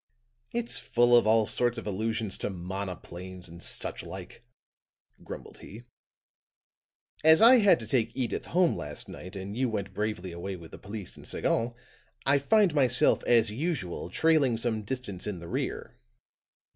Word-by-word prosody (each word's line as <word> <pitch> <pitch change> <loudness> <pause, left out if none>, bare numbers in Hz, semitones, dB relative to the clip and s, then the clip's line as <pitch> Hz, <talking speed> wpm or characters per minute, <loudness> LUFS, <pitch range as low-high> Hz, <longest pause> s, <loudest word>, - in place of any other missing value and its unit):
"It's 235 0 -2
full 120 0 +4
of 120 - +5
all 110 0 +4
sorts 120 +2 +1
of 115 - -6
allusions 110 0 -1
to - - -2
monoplanes 90 -1 -7
and 85 0 -12
such - - -1
like," - - -10 0.8
grumbled - - -9
he. 110 +4 -11 1.4
"As 160 0 +8
I 240 +3 +8
had 200 - +5
to - - -6
take 115 0 +1
Edyth 125 -3 -2
home 180 -1 +2
last - - -6
night, 90 +3 -10
and 95 +2 -6
you 130 +1 0
went 100 -3 -4
bravely 105 -4 -3
away 90 +3 -5
with 85 -3 -12
the - - -10
police 105 -2 -7
and - - -12
Sagon, 120 +1 0 0.5
I 140 +1 +4
find 200 +4 +3
myself, 130 -4 +3
as 115 -3 +4
usual, 120 - -3
trailing 145 - +3
some 115 -1 -1
distance 105 -4 -5
in 105 -3 -3
the 85 0 -9
rear." - - -4
110 Hz, 160 wpm, -28 LUFS, 95-130 Hz, 1.4 s, As